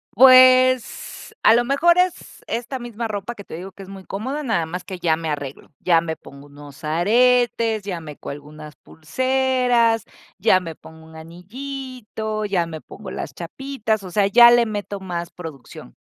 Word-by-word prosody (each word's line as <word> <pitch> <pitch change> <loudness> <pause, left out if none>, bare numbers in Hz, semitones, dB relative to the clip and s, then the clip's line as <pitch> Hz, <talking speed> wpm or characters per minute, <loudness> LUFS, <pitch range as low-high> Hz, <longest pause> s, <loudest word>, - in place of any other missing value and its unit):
Pues, 255 - +5
a 220 - +7
lo 240 +1 +3
mejor 300 +7 +3
es 360 -1 -1
esta 245 +3 -4
misma 235 -1 -5
ropa 210 +2 -5
que 200 - -10
te - - -10
digo 180 +4 -7
que 195 0 -12
es - - -15
muy 195 -1 -10
cómoda, 260 +12 -4
nada 225 - -1
más 180 +3 -6
que 185 -1 -8
ya 165 -2 +2
me 160 0 -5
arreglo, 140 -2 -6
ya 170 -2 +3
me 160 -1 -4
pongo 140 +1 -14
unos 145 0 -14
aretes, 225 +6 +2
ya 180 -4 -4
me 150 -3 -10
cuelgo 145 +1 -9
unas 150 0 -11
pulseras, 250 +4 0 0.3
ya 190 -1 +4
me 165 -3 -7
pongo 160 +1 -15
un 160 - -16
anillito, 220 +5 -7
ya 190 -5 0
me 160 -1 -8
pongo 200 +4 -10
las - - -6
chapitas, 220 +3 -3
o 185 - -9
sea, 200 +2 +2
ya 235 +4 +8
le 240 -1 +4
meto 205 -2 -5
más 175 -3 -5
producción. 145 - -11
205 Hz, 180 wpm, -21 LUFS, 165-245 Hz, 0.3 s, ya